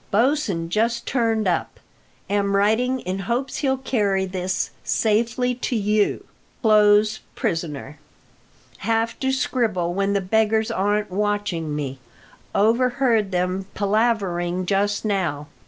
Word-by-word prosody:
Bosin 220 - +1
just 230 +5 0
turned 225 -4 +1
up. 175 - -1 0.5
Am 200 0 +1
writing 235 +6 +2
in 185 +1 -3
hopes 240 +7 -2
he'll 265 -2 +1
carry 205 -7 0
this 185 0 -2
safely 235 +3 +1
to 245 0 -3
you. 210 -1 +1 0.4
Close 210 0 +4 0.2
prisoner. 150 -3 -3 0.8
Have 225 0 0
to 265 0 0
scribble 220 -10 0
when 200 +1 0
the 200 - +2
beggars 220 +3 +1
aren't 205 0 0
watching 205 -6 -1
me. 135 -3 -4 0.6
Overheard 235 0 +2
them 185 +1 -1
palavering 195 -4 0
just 205 +3 0
now. 175 -8 -1
205 Hz, 115 wpm, -23 LUFS, 185-230 Hz, 0.8 s, Close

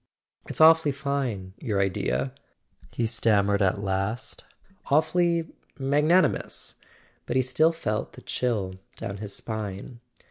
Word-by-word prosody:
"It's - - -5
awfully 160 -2 +6
fine: 135 -9 -3
your 105 -7 -1
idea," 70 -9 0 0.6
he 120 - -1
stammered 105 -3 +2
at 100 +1 +1
length. 95 +6 -2 0.5
"Awfully—magnanimous." 160 0 +1 0.5
But 120 - -2
he 130 - +4
still 155 +6 +3
felt 110 -10 -3
the - - -12
chill 100 -7 -2 0.2
down 100 - -5
his 100 -1 -5
spine. 110 +1 -4
115 Hz, 110 wpm, -26 LUFS, 100-145 Hz, 0.6 s, awfully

